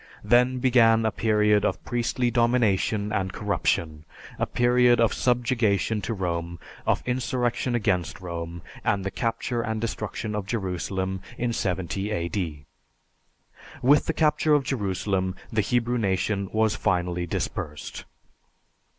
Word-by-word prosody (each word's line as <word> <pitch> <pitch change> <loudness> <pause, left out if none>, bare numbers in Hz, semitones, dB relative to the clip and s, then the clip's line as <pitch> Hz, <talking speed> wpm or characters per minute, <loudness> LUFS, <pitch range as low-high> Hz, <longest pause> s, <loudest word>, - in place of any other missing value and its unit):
Then 125 +1 +4
began 115 -3 +4
a 110 - +2
period 105 -2 +2
of - - -1
priestly 120 0 0
domination 110 -3 +2
and 95 -3 -1
corruption, 85 -7 -1 0.4
a - - +1
period 120 0 +4
of 115 -2 +3
subjugation 115 -4 +1
to 115 - -3
Rome, 85 -2 -3 0.3
of - - +2
insurrection 125 -1 -1
against 95 -8 0
Rome, 85 -1 -6 0.2
and 100 -1 0
the 100 - -2
capture 115 +3 -2
and 110 -1 -2
destruction 110 -1 -4
of 105 -2 -3
Jerusalem 95 -2 -2 0.2
in 120 -1 -1
70 95 +1 -2
A.D. 85 -6 -3 1.2
With 145 +4 +5
the 160 - +1
capture 155 -1 +3
of 145 - +2
Jerusalem, 95 -6 -1 0.2
the 110 - +3
Hebrew 120 +3 0
nation 100 -1 0
was 110 -1 +2
finally 90 -2 0
dispersed. 75 -2 -4
105 Hz, 125 wpm, -25 LUFS, 95-120 Hz, 1.2 s, With